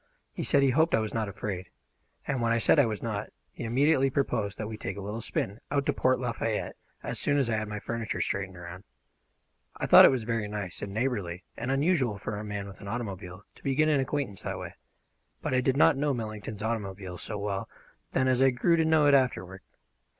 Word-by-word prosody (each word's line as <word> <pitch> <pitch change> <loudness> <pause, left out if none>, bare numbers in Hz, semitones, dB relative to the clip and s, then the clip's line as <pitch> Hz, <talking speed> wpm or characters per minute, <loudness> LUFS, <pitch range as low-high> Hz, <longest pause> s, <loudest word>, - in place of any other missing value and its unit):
He - - -4
said 140 - +3
he 135 - +4
hoped 160 +5 +3
I - - +2
was 110 -1 -3
not 110 -3 -1
afraid; 95 -2 -5 0.6
and 135 -4 -1
when 115 0 +2
I 115 - +3
said 115 - +4
I 140 - +5
was 110 -2 -4
not, 110 -3 -3 0.2
he - - -8
immediately 135 +4 +3
proposed 120 -7 -1
that 105 - -4
we 110 - -5
take 100 -2 -5
a - - -5
little 105 +4 -4
spin 105 -1 -3
out 140 -1 0
to - - +2
Port 130 0 +2
Lafayette 115 -3 -2 0.3
as - - -4
soon 145 - +2
as 130 -5 +1
I 110 - +1
had 110 0 -2
my 105 0 -4
furniture 115 0 -3
straightened 95 -2 -2
around. 90 +2 -9 0.9
I - - -2
thought - - +10
it - - +8
was 130 -4 0
very 115 -2 -1
nice 105 -4 -5
and 100 - -4
neighbourly 100 -6 -2
and 120 +3 -4
unusual 135 - +2
for 105 0 -4
a - - -5
man 105 -1 -4
with 100 - -12
an 100 - -8
automobile 100 -4 -5
to - - -21
begin 145 +3 +2
an 145 -2 +3
acquaintance 135 -7 -2
that - - -4
way; - - -7 0.7
but - - -3
I 130 - +3
did 130 +1 +1
not 145 - +6
know 140 0 0
Millington's 110 -2 -5
automobile 95 -5 -4
so 105 - -4
well 100 -1 -3 0.4
then 130 -1 +2
as 130 0 +3
I 135 - +6
grew 170 +7 +2
to 160 - +3
know 160 -2 +4
it 145 - +5
afterward. 95 -9 +1
115 Hz, 225 wpm, -28 LUFS, 100-135 Hz, 0.9 s, thought